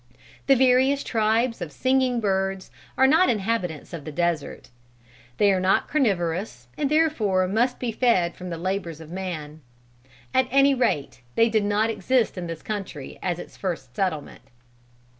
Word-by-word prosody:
The 270 - +6
various 260 +2 +3
tribes 225 0 +1
of 165 -3 -5
singing 255 - +1
birds 195 -2 -1 0.3
are 265 - +5
not 320 +7 +5
inhabitants 195 - -2
of 165 -4 -6
the 155 - -7
desert. 170 -5 -2 0.7
They 200 -1 +4
are 185 - +1
not 185 +1 +2
carnivorous 185 - -1
and 285 - -1
therefore 235 - +2
must 240 +6 +1
be 245 -2 -2
fed 210 -8 +2
from 180 0 -8
the 170 - -4
labors 175 -2 -3
of 160 0 -11
man. 160 -5 -6 0.7
At 260 -1 +3
any 275 +2 +5
rate 230 - -1
they 230 0 +4
did 215 -2 +1
not 210 +2 +1
exist 250 +1 +1
in 180 -2 -5
this 165 -1 -7
country 195 -10 -6
at 175 -2 -1
its - - -10
first 160 -10 -5
settlement. 170 -7 -3
200 Hz, 160 wpm, -24 LUFS, 175-245 Hz, 0.7 s, The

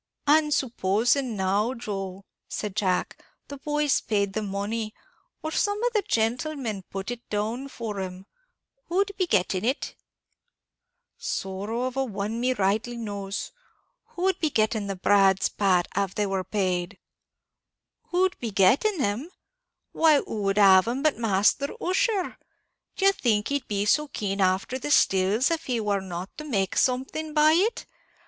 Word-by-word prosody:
"And 300 +1 +4
supposing 240 0 +1
now, 200 +6 0
Joe," 195 -4 -5 0.2
said 210 -2 -4
Jack, 190 -4 -1 0.3
"the 285 - -7
boys 295 0 +1
paid 200 -3 0
the 215 - -1
money, 210 +2 -3 0.5
or 315 - -3
some 410 +4 +1
of 485 -1 +1
the 425 - +2
gentlemen 230 - -1
put 195 +4 -5
it 240 0 -8
down 220 +6 -2
for 225 -6 -5
'em; 185 0 -6 0.6
who'd 390 +3 +1
be 370 -2 0
getting 185 - +1
it?" 255 +5 -1 1.3
"Sorrow 200 +5 -3
a 270 - +1
one 205 -3 -3
of 230 - -3
me 255 +1 +1
rightly 220 +3 0
knows. 200 -3 -5 0.5
Who 355 - -7
would 380 0 +2
be 315 - +1
getting 215 -4 0
the 195 - -3
brads, 195 0 +3
Pat, 185 -4 +2
av 195 -1 -1
they 210 - +1
war 195 -1 -1
paid?" 185 -3 -1 1.1
"Who'd 370 +1 +1
be 235 - -3
getting 245 - +3
'em? 220 +11 -2 0.6
why, 320 -2 +5
who 215 - -5
would 195 0 0
have 190 -1 +7
'em 255 +4 -2
but 305 -6 +2
Masther 220 +5 +2
Ussher? 380 +1 0 0.6
D'ye 390 0 +4
think 220 - 0
he'd 285 -2 -2
be 205 -1 -1
so 300 +8 +3
keen 200 -6 -3
afther 190 +7 +1
the 295 - -4
stills, 205 - +3
av 330 -1 0
he 245 -3 -1
war 205 -2 0
not 185 0 -7
to - - -5
make 200 -10 -1
something 270 +5 0
by 305 +1 +6
it? 400 +9 +1
220 Hz, 155 wpm, -26 LUFS, 195-285 Hz, 1.3 s, have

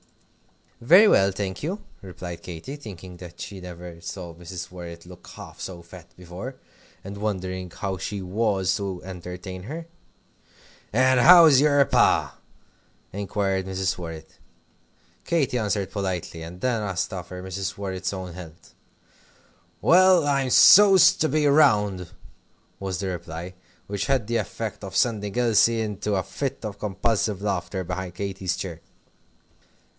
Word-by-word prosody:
"Very 180 - +7
well, 100 - +4
thank 95 -1 -4
you," 185 +8 -4 0.2
replied 90 -2 -8
Katy, 90 - -7
thinking 95 - -10
that 85 -1 -12
she 95 -2 -7
never 90 -1 -10
saw 85 -1 -7
Mrs. 85 +1 -8
Worrett 85 -2 -9
look 90 0 -14
half - - -11
so 90 -2 -7
fat 85 0 -13
before, 90 +9 -8 0.5
and 100 +1 -8
wondering 95 -3 -3
how 95 +2 -4
she 100 +2 -4
was 95 -1 0
to 95 -3 -4
entertain 90 0 -8
her. 160 +7 -6 1.1
"And 130 +2 +4
how's 160 -2 +8
your 145 -2 +4
Pa?" - - +2 0.7
inquired 95 -1 -2
Mrs. 95 -1 -1
Worrett. 80 -2 -9 0.8
Katy 140 -7 0
answered 100 -3 -1
politely, 90 -4 -4
and 85 +2 -9
then 120 -3 0
asked 95 0 -2
after 90 0 -7
Mrs. 95 +1 -4
Worrett's 95 -2 -3
own 95 -3 -6
health. 85 -2 -12 1.1
"Well, 185 -2 +5
I'm 140 -2 +1
so's 195 +6 +8
to 155 - +1
be 150 +2 +1
round," 105 - +3 0.7
was 95 -2 -3
the 95 0 -3
reply, 85 0 -6 0.3
which 100 +2 -3
had 135 -5 +1
the 115 +2 0
effect 110 0 -5
of 95 -1 -7
sending 105 0 0
Elsie 115 -1 +3
off - - -1
into 105 0 -2
a 95 - 0
fit 135 +4 -4
of 100 -1 -6
convulsive 105 0 -1
laughter 95 -1 -2
behind 90 0 -5
Katy's 95 -2 -3
chair. 85 -4 -6
95 Hz, 140 wpm, -24 LUFS, 90-115 Hz, 1.1 s, how's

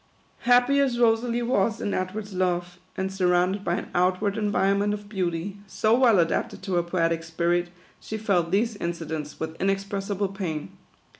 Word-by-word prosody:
Happy 245 +3 +5
as 265 -4 +2
Rosalie 235 +1 +2
was 225 -2 +1
in 205 - -2
Edward's 200 +3 -3
love, 175 -1 -1 0.2
and 190 0 -2
sur 190 -2 +1
rounded 180 +3 +2
by 170 - 0
an - - -5
outward 185 +3 +1
environment 205 -1 +1
of 205 0 -10
beauty, 185 -1 -2
so 215 +3 +1
well 240 -4 +5
adapted 165 -2 0
to 190 - -3
her 175 - +3
poetic 165 -1 0
spirit, 170 +2 0 0.3
she 220 - -5
felt 195 -6 +1
these 220 +5 +1
incidents 160 -4 -4
with 160 0 -4
inexpressible 195 0 -1
pain. 180 -6 -5
195 Hz, 160 wpm, -25 LUFS, 175-210 Hz, 0.3 s, Happy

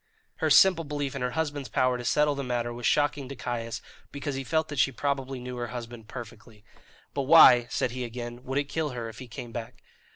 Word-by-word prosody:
Her - - 0
simple 185 -3 +6
belief 145 -2 -3
in - - -4
her 125 -1 -1
husband's 145 -4 -2
power 130 -1 +2
to 120 - -5
settle 150 +4 +2
the 140 0 -4
matter 120 -2 -2
was 120 0 -2
shocking 145 -2 +1
to 140 - -6
Caius, 115 -2 -4 0.3
because 145 0 -4
he 135 0 -3
felt 160 +3 0
that 145 -3 -4
she 135 - +4
probably 135 0 -2
knew 125 0 -6
her 120 0 -3
husband 120 -2 -8
perfectly. 115 -3 -10 0.5
"But 140 -2 -2
why," 125 -7 +8
said 125 - -1
he 125 +1 -4
again, 120 0 -6
"would 135 +1 -2
it 145 - +2
kill 155 +2 -2
her 115 -1 -4
if 115 - -11
he 130 - -8
came 120 0 -8
back?" 115 -1 -7
125 Hz, 225 wpm, -27 LUFS, 120-145 Hz, 0.5 s, why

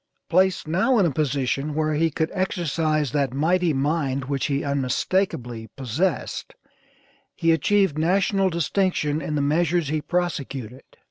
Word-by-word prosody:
Placed 185 -1 +2
now 190 +11 +2
in 200 - +4
a 165 - +2
position 140 0 -1
where 155 0 0
he 165 +2 +2
could 160 +1 -2
exercise 160 - 0
that 140 -3 0
mighty 170 +4 +2
mind 140 -1 0
which 140 +1 -1
he 140 -1 -1
unmistakably 130 - -1
possessed, 135 - -2 0.8
he 165 -1 +2
achieved 165 0 +2
National 195 +3 +2
distinction 170 -2 0
in 150 +1 -3
the 145 - +1
measures 165 +1 +1
he 155 0 -1
prosecuted. 140 -9 -3
155 Hz, 135 wpm, -24 LUFS, 140-175 Hz, 0.8 s, in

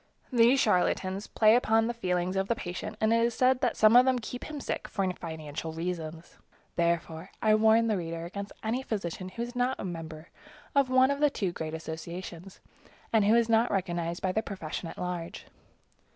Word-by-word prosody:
These 240 +3 +5
charlatans 190 -1 +1
play 215 0 +4
upon 225 -2 +3
the 240 - -1
feelings 180 -4 -1
of 195 0 0
the 235 - +1
patient, 175 -4 -6
and 220 +1 +3
it 230 0 +3
is 235 0 0
said 255 0 +3
that 245 -3 0
some 215 +1 +6
of 250 - +9
them 260 -1 +2
keep 245 +1 -6
him 305 -1 -6
sick - - -4
for 195 -3 -1
financial 160 -1 -6
reasons. 165 -1 -5 0.4
Therefore, 170 0 -1
I 215 -1 +3
warn 220 +1 +5
the 220 -3 +1
reader 165 -1 -4
against 200 +3 -6
any 230 +4 -1
physician 185 -6 -4
who 230 +5 -5
is 240 +1 -7
not 250 +2 0
a - - -4
member 165 -2 -7 0.4
of 280 -2 +3
one 260 +1 +5
of 280 - -2
the 295 0 +4
two 195 -9 -2
great 160 -2 -5
associations, 170 +3 -7 0.5
and 215 -2 +4
who 215 +3 +5
is 235 -1 +3
not 230 +1 +3
recognized 175 -3 -2
by 185 - +1
the 220 - 0
profession 175 -5 -6
at - - -10
large. 180 -2 -5
195 Hz, 195 wpm, -29 LUFS, 170-230 Hz, 0.5 s, of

